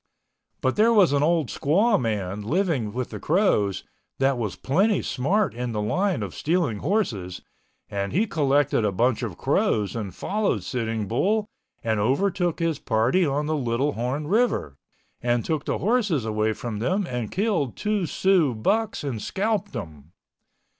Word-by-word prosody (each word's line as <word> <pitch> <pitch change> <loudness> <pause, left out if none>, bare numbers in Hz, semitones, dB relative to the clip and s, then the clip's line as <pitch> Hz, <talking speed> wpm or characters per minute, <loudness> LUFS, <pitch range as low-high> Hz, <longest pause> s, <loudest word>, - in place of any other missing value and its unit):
But 130 - 0
there 220 +2 +5
was 200 -10 +5
an 140 - +2
old 160 -3 +2
squaw 195 - +2
man 105 -3 -2
living 140 - 0
with 125 +2 -4
the - - -6
Crows 150 - +1 0.3
that 135 0 +2
was 110 -6 -3
plenty 195 +8 +1
smart 190 +11 0
in 120 0 -4
the 105 - -2
line 185 - 0
of - - -6
stealing 155 - 0
horses 115 - -1 0.4
and 100 0 -3
he 205 +6 +2
collected 145 - +2
a 105 - +1
bunch 115 +5 +1
of - - -4
Crows 105 -2 +1
and 105 -4 -4
followed 200 - -1
Sitting 115 -2 -2
Bull 205 - +1 0.4
and 110 -2 0
overtook 175 - +1
his 165 -4 -1
party 125 +11 +2
on 145 +2 0
the 155 +1 0
Little 130 +1 0
Horn 130 +6 -2
River, 210 - +1 0.5
and 120 -1 0
took 155 -3 -1
the - - -1
horses 205 - +1
away 110 0 0
from 110 -1 -5
them 185 - 0
and 125 -8 -4
killed 190 - 0
two 210 -4 -1
Sioux 165 -4 +2
bucks 210 - 0
and 125 -7 -3
scalped 205 - -1
them. 80 - -8
135 Hz, 160 wpm, -25 LUFS, -, 0.5 s, there